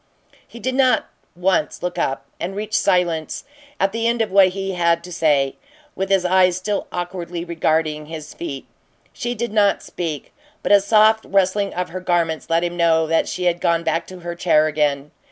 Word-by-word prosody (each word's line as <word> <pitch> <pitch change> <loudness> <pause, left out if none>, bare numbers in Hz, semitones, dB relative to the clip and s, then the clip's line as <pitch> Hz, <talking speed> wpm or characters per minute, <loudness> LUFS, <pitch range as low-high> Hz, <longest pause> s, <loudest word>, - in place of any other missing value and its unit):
He 235 - -12
did 255 +4 -2
not 255 -3 +2 0.3
once 180 +1 0
look 180 0 -3
up, 135 - -1
and 180 +3 -4
reached 215 +1 -5
silence, 175 -6 +1 0.4
at 195 +1 +2
the 230 +2 -1
end 235 0 +1
of 215 - -5
what 195 -1 +6
he 195 +1 -3
had 170 -2 +1
to 180 - -10
say, 145 -5 +1 0.4
with 195 0 -2
his 195 -2 +2
eyes 185 -1 +4
still 200 +2 -2
awkwardly 175 -1 -5
regarding 160 -2 0
his 155 -1 -8
feet. 140 -6 -6 0.5
She 240 0 -3
did 235 -1 -3
not 205 -2 +3
speak, 160 -5 -5 0.3
but - - 0
a 200 -1 +7
soft 215 +2 +4
rustling 195 +1 +1
of 180 0 -2
her 185 +3 -5
garments 170 -3 -1
let 165 +1 +2
him 175 0 -2
know 165 -2 +3
that 165 +1 +1
she 180 - -4
had 175 -1 +1
gone 170 0 +1
back 165 +1 -1
to 185 -1 -10
her 170 0 -5
chair 165 -3 +3
again. 150 -2 0
175 Hz, 190 wpm, -21 LUFS, 165-195 Hz, 0.5 s, a